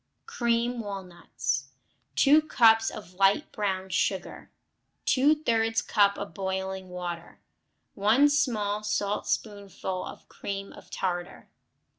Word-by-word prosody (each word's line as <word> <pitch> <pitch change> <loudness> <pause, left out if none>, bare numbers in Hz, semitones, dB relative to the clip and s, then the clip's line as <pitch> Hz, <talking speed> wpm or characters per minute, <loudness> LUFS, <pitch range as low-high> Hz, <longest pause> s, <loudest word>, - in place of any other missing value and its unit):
Cream 240 - 0
Walnuts 180 - -4 0.5
2 295 +3 +6
cups 225 -6 +4
of 205 -4 -10
light 195 +9 +2
brown 190 -3 -2
sugar. - - -2 0.6
Two 275 +4 +4
thirds 225 -6 +1
cup 200 -2 +3
of 200 0 -6
boiling 190 -1 -3
water. 175 -1 -6 0.5
1 220 +8 +4
small 220 -8 0
saltspoonful 205 -2 -2
of - - -10
cream 195 0 -6
of - - -14
tartar. 175 -1 -4
205 Hz, 105 wpm, -27 LUFS, 190-230 Hz, 0.6 s, 2